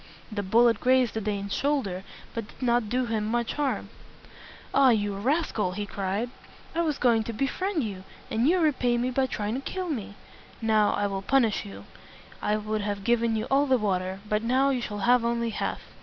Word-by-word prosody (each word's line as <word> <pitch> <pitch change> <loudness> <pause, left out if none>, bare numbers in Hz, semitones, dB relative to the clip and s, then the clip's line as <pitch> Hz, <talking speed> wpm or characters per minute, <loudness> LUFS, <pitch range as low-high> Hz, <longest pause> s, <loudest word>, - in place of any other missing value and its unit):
The 210 -1 -2
bullet 230 +3 +4
grazed 255 -2 +3
the 220 - -2
Dane's 200 -1 -2
shoulder, 265 -11 0 0.3
but 230 -2 -4
did - - -18
not 240 -3 +1
do 250 +2 +1
him 225 -2 -1
much 235 +1 0
harm. 290 -2 -1 0.8
"Ah, 270 -2 +6
you 205 -3 +1
rascal!" 220 - 0
he 205 +2 -3
cried. 200 +4 -2 0.4
"I 335 - +1
was 310 -4 0
going 230 -3 +3
to 230 - -4
befriend 310 - -1
you, 195 -4 -5 0.3
and 230 +4 +2
you 355 +4 +4
repay 255 -7 +2
me 250 +2 0
by 260 +1 +1
trying 210 -3 -3
to 260 - -2
kill 370 +5 -4
me. 215 -8 -4 0.4
Now 215 -2 +3
I 205 - 0
will 195 -1 -2
punish 230 -1 +2
you. 100 0 -10 0.6
I 210 - +1
would 215 0 -2
have 205 -1 -3
given 235 0 +2
you 220 0 -1
all 280 +2 +4
the 260 -1 +4
water, 190 -3 -1
but 210 0 +1
now 260 +4 +2
you 255 -2 -1
shall 205 -3 -4
have 245 0 +5
only 235 0 0
half." - - -3
230 Hz, 200 wpm, -27 LUFS, 205-255 Hz, 0.8 s, Ah